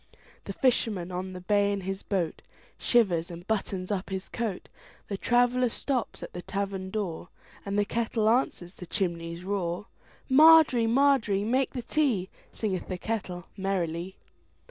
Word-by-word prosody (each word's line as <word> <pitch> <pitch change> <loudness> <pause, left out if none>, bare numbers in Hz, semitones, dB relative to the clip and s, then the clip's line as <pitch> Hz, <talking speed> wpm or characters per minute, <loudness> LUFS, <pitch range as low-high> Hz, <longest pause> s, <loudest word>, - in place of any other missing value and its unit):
The - - -5
fisherman 220 -8 +1
on 185 +1 -4
the 180 - -7
bay 205 +2 +2
in 200 -1 -2
his 195 +1 -4
boatShivers 180 +1 -1
and 175 0 -9
buttons 195 -3 -2
up 195 -1 -2
his 190 -1 -4
coat; 220 -6 -3 0.4
The 200 - -2
traveller 245 +3 +2
stops 255 +1 -2
at - - -8
the 180 - -5
tavern 195 0 -3
door, 190 -5 -4 0.4
And 200 +1 -1
the 205 - +3
kettle 225 0 0
answers 220 -7 +1
the 180 - -10
chimney's 170 -3 -2
roar. 185 -1 -2 0.4
Margery, 295 -4 +7
Margery, 235 -5 +3
make 255 +5 +1
the 250 - -4
tea, 235 -10 0 0.2
Singeth 195 -5 -3
the 185 - -3
kettle 180 -4 -4
merrily. 185 -2 -2
200 Hz, 145 wpm, -28 LUFS, 180-230 Hz, 0.4 s, Margery